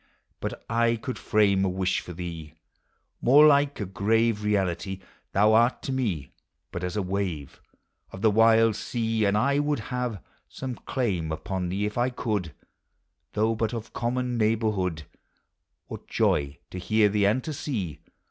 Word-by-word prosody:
But - - -5
I 115 0 +2
could 125 +3 -5
frame 100 -2 +3
a 95 - +2
wish 95 0 0
for - - -9
thee 85 -3 -7 0.7
More 145 +5 +7
like 145 -1 +4
a 105 - -2
grave 105 +3 +1
reality: 95 -2 -1 0.3
Thou 105 +2 +4
ai 115 +2 +6
t - - -18
to 135 - -3
me 110 - -2 0.4
but 90 - -5
as 90 +2 -3
a 105 - 0
wave 90 -7 -3 0.5
Of 95 - -9
the 110 - +5
wild 115 0 +5
sea; 115 -1 -1
and 100 +1 +2
I 140 +6 +2
would 145 0 +1 0.2
have 125 -5 -2 0.3
Some 130 -1 -5
claim 100 -11 -2
upon 90 +2 -3
thee, 100 +3 -1
if 105 +2 -4
1 125 +1 +1
could, 105 -10 -2 0.8
Though 110 +2 +2
but 115 0 -1
of 115 -1 -7
common 125 0 -1
neighborhood. 105 -7 0 0.8
What - - -9
joy 70 0 +1
to 90 - -5
hear 105 +4 +3
thee, 100 0 +2
and 120 +6 +1
to 155 - -4
sec? 120 - -4
105 Hz, 165 wpm, -26 LUFS, 95-120 Hz, 0.8 s, More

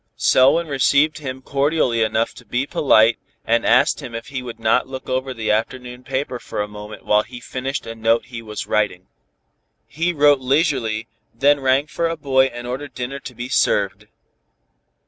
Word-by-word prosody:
Selwyn 140 +6 +4
received 140 +2 +2
him 130 -3 -6
cordially 140 -4 +1
enough 110 +1 0
to - - -14
be 125 +3 -2
polite, 115 -6 +3 0.3
and - - +2
asked - - +4
him 115 - -8
if 115 +4 -7
he 130 -2 -4
would 120 -2 -8
not 115 +3 +2
look 130 0 -8
over 130 +1 -2
the 115 -4 -2
afternoon 125 +3 -3
paper 130 -2 -3
for - - -6
a 105 - -1
moment 105 +1 -10
while 105 0 +4
he 120 +3 -10
finished 130 +3 -4
a 115 - -6
note 115 +1 +1
he 120 -2 -8
was 105 -2 -6
writing. 100 -4 0 0.8
He 170 +3 -1
wrote 145 -3 +4
leisurely, 130 -5 0 0.3
then 145 +4 +3
rang 135 +1 +2
for 165 +2 -2
a 165 - -3
boy 135 -3 +3
and 120 -2 -6
ordered 130 +3 -6
dinner 130 +2 -4
to 125 -2 -10
be 120 +2 -5
served. - - +1
130 Hz, 180 wpm, -21 LUFS, 115-140 Hz, 0.8 s, Selwyn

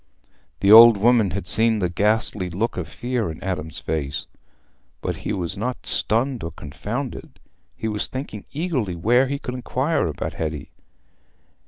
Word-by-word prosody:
The 100 - +4
old 115 0 +10
woman 115 -1 +3
had 95 0 -4
seen 110 +4 +4
the 95 -4 0
ghastly 105 +1 0
look 105 +7 -2
of 90 -4 -4
fear 120 +3 -3
in 80 - -7
Adam's 80 -5 -4
face. 70 -3 -3 0.7
But - - -4
he - - -5
was 90 -3 -1
not 125 +5 -4
stunned 120 +3 +2
or 80 - -3
confounded: 100 - -6 0.4
he 110 - -3
was 105 -1 -2
thinking 130 -6 -7
eagerly 140 - -2
where 120 +10 +3
he 140 +1 -2
could 125 -2 -6
inquire 130 - -1
about 75 - -4
Hetty. 75 -2 -5
105 Hz, 155 wpm, -22 LUFS, 90-125 Hz, 0.7 s, old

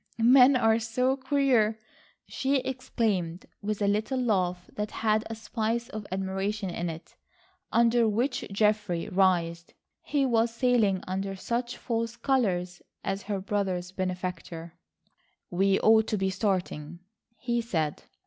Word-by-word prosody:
"Men 255 +2 +7
are 225 -2 +3
so 250 +4 +1
queer!" 260 -5 +2 0.5
she 270 +1 0
exclaimed 215 -10 -2 0.2
with 210 0 -2
a - - +2
little 215 +6 0
laugh 180 -7 0
that 210 0 -3
had 215 -1 +1
a 225 - -4
spice 225 +1 -2
of 215 -1 -7
admiration 195 +1 -2
in 175 0 -3
it, 165 +1 -9 0.6
under 235 0 +4
which 245 +5 0
Geoffrey 205 -4 +1
writhed. 175 -3 +1 0.3
He 285 -2 0
was 230 -2 +2
sailing 230 -6 +2
under 195 +1 -3
such 240 +5 -3
false 230 -1 -2
colours 185 -10 0 0.2
as 195 +1 -2
her 200 -1 -3
brother's 190 -2 -2
benefactor. 180 -3 -4 0.8
"We 195 +2 +2
ought 220 0 +5
to 215 - 0
be 190 0 0
starting," 180 -5 -2 0.4
he 240 -1 -1
said. 160 -10 -2
210 Hz, 130 wpm, -28 LUFS, 185-235 Hz, 0.8 s, Men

